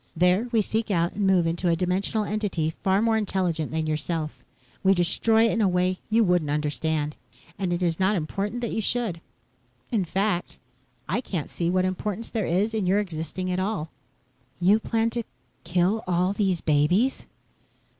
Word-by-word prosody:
There, 180 +7 +3
we 225 -3 +3
seek 220 +2 -1
out 170 -3 +1
and 200 -1 0
move 185 -3 +4
into 170 +2 0
a 165 - +3
dimensional 185 +5 0
entity 200 -7 -1
far 195 +2 +2
more 225 -1 +3
intelligent 180 -7 -1
than 160 0 -2
yourself. 155 0 -2 0.4
We 195 0 +5
destroy 220 +6 +3
it 230 - +2
in 230 - 0
a 205 - +4
way 180 0 +1
you 225 +1 +4
wouldn't 180 -6 +2
understand, 150 0 -1 0.4
and 185 -3 -1
it 175 +1 0
is 170 -1 0
not 190 +3 +3
important 200 +7 -3
that 235 - -2
you 225 - -1
should. 220 -7 -1 0.7
In 215 -5 +2
fact, 190 +1 -1 0.5
I 190 - 0
can't 175 - -4
see 170 -1 -1
what 185 +1 +2
importance 205 +4 -3
there 220 -5 -1
is 200 +6 +1
in 210 -4 0
your 190 +2 +3
existing 185 -1 -3
at 180 - 0
all." 185 -5 -2 0.7
"You 195 +5 +4
plan 225 0 0
to 240 0 -2 0.4
kill 185 +5 +1
all 180 +2 +1
these 195 -4 0
babies?" 170 - +2
185 Hz, 175 wpm, -25 LUFS, 170-215 Hz, 0.7 s, We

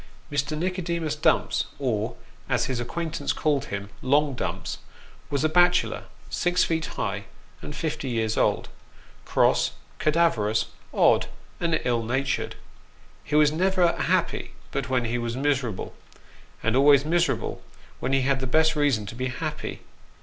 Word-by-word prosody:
MB. 145 +2 -1
NICODEMUS 170 -3 -1
DUMPS, 155 - +2
or, 115 -6 -1 0.3
as - - +2
his 130 -2 -2
acquaintance 155 +4 -2
called 145 -3 +1
him, 100 0 -5
" - - -23
long 145 -1 +4
Dumps," 125 - -4 0.5
was 140 +1 0
a - - +5
bachelor, 175 +2 +3 0.2
six 175 0 +1
feet 160 -1 0
high, - - -2 0.4
and 150 - -7
fifty 150 -3 -3
years 110 -2 0
old: - - +1 0.6
cross, - - +3 0.3
cadaverous, 150 -10 +2 0.3
odd, - - +4 0.3
and 165 -2 +1
ill 120 -2 +2
natured. 130 +4 -1 0.7
He 150 - -2
was 150 -1 +6
never 180 +1 +2
happy - - 0 0.2
but 135 -3 -2
when 130 -2 +1
he 120 +1 -1
was 120 +1 -3
miserable; 135 -7 -1 0.7
and - - +2
always 140 +1 +6
miserable 170 +2 0 0.4
when 130 - -2
he 135 0 +3
had 135 +1 +1
the 130 - -2
best 160 +4 +3
reason 140 -8 +2
to 100 - -7
be 130 +2 -2
happy. 125 - -4
145 Hz, 145 wpm, -26 LUFS, 125-160 Hz, 0.7 s, was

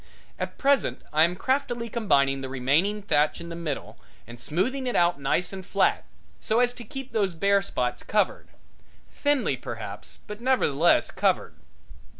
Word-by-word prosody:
At - - -4
present 280 0 +1
I 155 - +4
am 175 +1 -2
craftily 240 +1 -1
combing 140 - +1
the 135 - -5
remaining 150 +11 +1
thatch 150 -6 +2
in 170 - -8
the 170 - -6
middle 160 -5 -5 0.3
and 120 +1 -12
smoothing 255 - -1
it 245 - -1
out 175 -3 +3
nice 175 +7 0
and 190 -1 -6
flat, - - +1 0.3
so 220 +1 +1
as 245 0 +3
to 245 - -9
keep 265 +3 -8
those 200 -6 0
bare 200 +4 +3
spots 125 -10 -2
covered 210 -3 0 0.7
thinly 290 -2 +1
perhaps, - - -8
but 210 +1 -8
nevertheless 175 - +3
covered. - - 0
195 Hz, 155 wpm, -26 LUFS, 150-240 Hz, 0.7 s, I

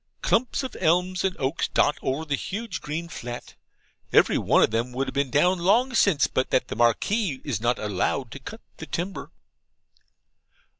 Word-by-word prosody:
Clumps 250 +3 +1
of 260 - -6
elms 180 +2 +1
and 190 -1 0
oaks 135 +4 -1
dot 145 - +2
over 135 +5 -2
the 145 - -2
huge 210 +10 -4
green 160 +3 -4
flat. 120 -6 -7 0.6
Every - - +5
one - - +4
of - - +2
them 115 +3 -1
would 135 +2 -1
have - - -6
been 140 -1 0
down 175 +8 +3
long 235 +9 +3
since, 200 -10 +4
but 130 - -1
that 125 - +1
the - - -4
Marquis 135 - +1
is 125 -8 -3
not 120 +1 +1
allowed 105 +4 -2
to 140 - -8
cut 220 - -9 0.2
the 160 - -8
timber. 180 +3 -4
150 Hz, 180 wpm, -25 LUFS, 130-190 Hz, 0.6 s, Every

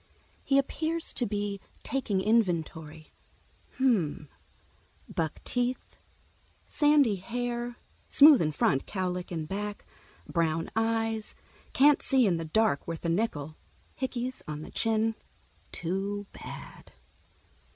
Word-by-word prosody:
He 275 - +3
appears 320 +4 0
to 245 - -1
be 205 -1 -2 0.2
taking 225 -8 -1
inventory: 165 -7 0 0.7
"Hmm, 220 - +2 0.8
buckteeth; 245 - -2 0.7
sandy 290 -8 +3
hair, 240 +4 -3 0.3
smooth 290 -2 +8
in 155 -2 +1
front, 135 -2 +1
cowlick 180 -2 -3
in 160 -3 -3
back; 205 +4 -5 0.4
brown 165 -1 0
eyes, 225 -1 0 0.4
can't 290 +1 +5
see 265 -2 +3
in 180 -5 +2
the 165 - -4
dark 205 -1 +1
worth 165 0 -5
a - - +1
nickel; 160 -6 -1 0.4
hickeys 255 -1 -3
on 150 0 -5
the - - -10
chin. 225 0 +1 0.6
Too 195 +4 -3
bad." - - -10
210 Hz, 110 wpm, -29 LUFS, 170-245 Hz, 0.8 s, smooth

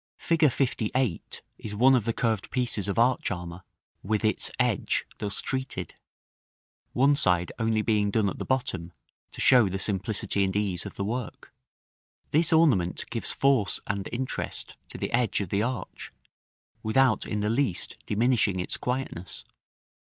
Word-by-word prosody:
Fig. 165 -1 0 0.2
LVIII. 125 - 0 0.4
is 105 -1 -6
one 130 +5 +5
of 120 -5 +2
the 115 - +1
curved 110 -3 -1
pieces 120 -6 -1
of 100 - -2
arch 120 +2 +2
armor, 90 -1 -6 0.4
with 110 +2 -1
its 110 - +1
edge - - +1
thus 100 -2 -3
treated; 130 - -4 1.0
one 140 +3 +4
side 90 - +1
only 110 -1 +1
being 105 -2 +2
done 105 0 +1
at - - -4
the - - -2
bottom, 95 -10 -2 0.4
to - - -12
show 125 -6 +5
the 95 - -3
simplicity 100 0 +1
and 95 0 -1
ease 100 -4 -1
of - - -10
the 100 - -3
work. 120 +2 -5 0.8
This 160 +2 +3
ornament 135 - +3
gives - - -1
force 130 -10 +2
and 100 -1 -3
interest 130 +2 -3
to - - -8
the - - -3
edge 120 -2 +2
of 100 -4 -3
the 100 +2 +1
arch, 120 -3 -4 0.7
without 120 0 +2
in 105 - -2
the 105 - 0
least 120 -7 +1
diminishing 110 -3 +2
its 90 - -2
quietness. 125 -8 -4
110 Hz, 155 wpm, -27 LUFS, 100-125 Hz, 1.0 s, one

